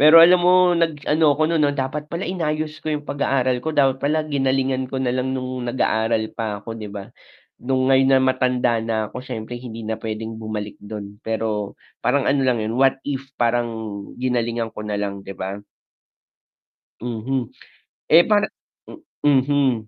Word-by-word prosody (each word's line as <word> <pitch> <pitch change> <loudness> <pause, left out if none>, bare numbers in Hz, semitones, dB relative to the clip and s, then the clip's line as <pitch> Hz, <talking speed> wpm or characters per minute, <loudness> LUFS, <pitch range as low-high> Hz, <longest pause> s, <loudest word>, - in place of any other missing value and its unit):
pero 155 +3 +8
alam 180 +1 +6
mo 180 0 +5
nag 165 -4 0
ano 150 -1 +4
ako 155 - +1
nun 160 -3 +3
dapat 145 +2 -3
pala 170 +3 -4
inayos 155 -3 -2
ko - - -14
yung 150 -1 -1
pag-aaral 130 -3 0
ko, 155 - -4
dapat 135 -2 +3
pala 155 +2 +1
ginalingan 135 -2 0
ko 135 - -4
nalang 130 +1 0
nung 130 -1 -4
nag 120 - -3
aaral 110 -2 +1
pa 105 -3 -4
ako 115 - -5
di 105 - -6
ba, 100 -1 -7 0.6
nung 130 +1 +1
ngayon 135 0 +5
na - - +4
matanda 125 -2 +2
na 115 0 -2 0.2
ako - - -5
siyempre 120 -1 -6
hindi 115 -2 -8
na 110 0 -3
pwedeng 110 0 -5
bumalik 105 -1 -5
dun 105 -1 -8
pero 110 -3 -2 0.3
parang 140 -2 +1
ano 140 - +2
lang 120 -3 +1
yun, 115 +3 -2
what 135 -1 +4
if 135 -1 -3
parang 120 0 +1 0.5
ginalingan 120 -2 -1
ko - - -8
nalang 100 -1 -3
di 95 0 -9
ba? 95 +2 -4 1.4
Mhm, 120 +2 -3 0.6
eh, 165 +3 +8
parang 210 -1 +3 0.7
mhm. 135 -5 +2
130 Hz, 165 wpm, -22 LUFS, 110-145 Hz, 1.4 s, pero